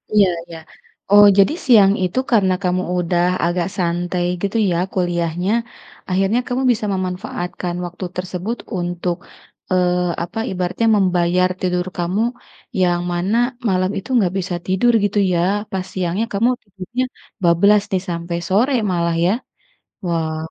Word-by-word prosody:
Iya 200 -2 +6 0.2
iya. 165 - -9 0.5
Oh, 205 0 +9
jadi 200 +10 +5
siang 205 -6 +6
itu 180 +8 0
karena 195 -5 +4
kamu 180 0 +1 0.2
udah 175 0 +1 0.2
agak 175 0 0
santai 175 0 -1 0.2
gitu 200 +3 -1
ya 170 - +1 0.2
kuliahnya 175 +1 -1 0.6
akhirnya 195 +5 +2
kamu 255 +2 -1
bisa 220 -2 -1
memanfaatkan 180 -1 -4
waktu 180 +2 -6
tersebut 185 +5 -4 0.2
untuk, 175 0 -2 0.6
eee, 180 -1 +2 0.3
apa 175 +6 -5
ibaratnya 185 +5 -1
membayar 180 -1 +2
tidur 180 -1 0
kamu 180 +5 0 0.6
yang 175 -1 +2
mana 180 +5 0 0.3
malam 185 0 +1
itu 205 +7 -7
nggak 190 -5 +2
bisa 180 -1 -3
tidur 190 +6 +3
gitu 205 0 +1
ya, 170 - +2 0.3
pas 190 -1 -2
siangnya 185 +4 -1
kamu 230 +5 +2
tidurnya 200 +5 -4 0.4
bablas 200 +5 +5
nih 185 -2 +1
sampai 170 0 -3
sore 235 +9 +3 0.2
malah 170 -1 0
ya? 185 - +3 0.7
Wah. 160 -2 -1
185 Hz, 140 wpm, -19 LUFS, 175-200 Hz, 0.7 s, Oh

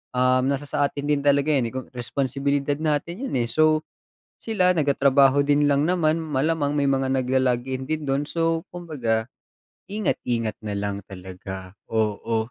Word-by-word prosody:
um, 130 0 +3
nasa 140 +1 -1
sa 145 - +1
atin 145 +1 -6
din 145 -1 +2
talaga 140 0 +3
'yan, 125 -4 +1
eh, - - -14
kung 130 - -4
responsibilidad 140 +3 -1
natin 160 - -2
'yun, - - -5
eh 120 - 0
so. 155 +1 +3 0.6
Sila 185 -5 +2
nagtatrabaho 140 -2 +4
din 145 0 +3
lang 140 +1 +3
naman, 165 -3 +2
malamang 150 0 0
may 140 -1 +2
mga 135 -1 +1
nag-lo-login 130 0 0
din 155 -1 -2
do'n, 135 +2 +1
so 165 -1 0
kumbaga, 130 -10 -2 0.6
ingat 210 -1 0
ingat 115 -3 -1
nalang 100 -1 -3
talaga. 95 0 -9 0.2
Oo. 110 +1 0
140 Hz, 155 wpm, -24 LUFS, 120-155 Hz, 0.6 s, nagtatrabaho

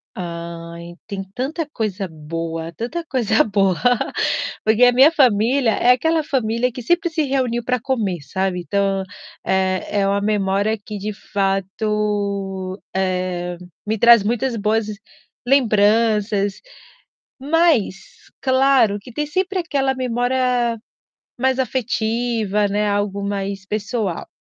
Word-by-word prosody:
Ai, 170 -1 -7
tem 195 -2 -4
tanta 290 +5 -3
coisa 200 -5 -3
boa, 165 +1 -5
tanta 320 - -4
coisa 230 -6 +2
boa. 195 -3 +2 0.9
Porque 220 +3 +4
a 245 - +7
minha 265 +5 +6
família, 250 -3 +3
é 240 +4 +4
aquela 320 +6 +2
família 250 -3 0
que 250 - -7
sempre 345 - +1
se 320 -1 0
reuniu 255 -4 0
pra 250 +1 0
comer, 220 - -1
sabe. 190 +3 -2
Então, 195 +1 0 0.4
eh, 190 -1 +1 0.2
é 195 - +2
uma 200 +1 +1
memória 205 +1 +1
que 210 0 -6
de 210 +2 -4
fato, 200 -1 -2 0.2
eh, 180 -2 -1 0.3
me 215 +1 -1
traz 235 -1 +7
muitas 240 +3 -1
boas 215 +1 0 0.6
lembranças. 215 -4 +3 0.8
Mas, 295 - +2 0.5
claro 260 -5 +3
que 225 +5 -13
tem 300 +5 -1
sempre 375 +5 -1
aquela 275 -6 0
memória 245 -1 0 0.6
mais 260 0 +2
afetiva, 230 -4 0
né, 205 +1 0
algo 200 0 -1
mais 200 -1 -3
pessoal. 210 -3 -2
215 Hz, 120 wpm, -20 LUFS, 195-250 Hz, 0.9 s, a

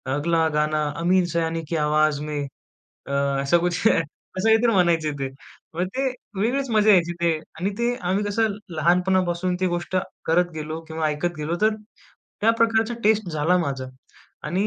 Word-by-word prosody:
"अगला 165 +2 +1
गाना 150 0 +1 0.2
अमीन 185 +1 +3
सयानी 165 0 -1
की 170 - -1
आवाज 150 -1 +2
में. 150 -1 -3 0.6
अ, - - -6 0.3
असं 140 +5 +3
कुछ" 175 +5 +1 0.5
असं 185 - -1
काहीतरी 225 +1 +4
म्हणायचे 170 -4 +2
ते. 135 - -2 0.5
मग 180 +2 0
ते 265 - 0 0.4
वेगळीच 265 +4 0
मजा 215 0 +4
यायची 175 -2 +3
ते 170 - +3 0.3
आणि 190 - 0
ते 240 +1 +1 0.2
आम्ही 200 +2 +1
कसं 205 0 0 0.2
लहानपणापासून 180 +2 +1
ती 185 - +1
गोष्ट 175 +1 -3 0.3
करत 175 +2 +2
गेलो 155 +1 -4
किंवा 160 -1 -1
ऐकत 150 +4 -1
गेलो 150 +3 -2
तर 215 0 +3 0.7
त्या 220 - +4
प्रकारचा 225 0 +2
टेस्ट 215 -2 +3
झाला 155 +3 +2
माझा 135 -6 -2 0.6
आणि 190 +5 0
175 Hz, 160 wpm, -23 LUFS, 155-200 Hz, 0.7 s, काहीतरी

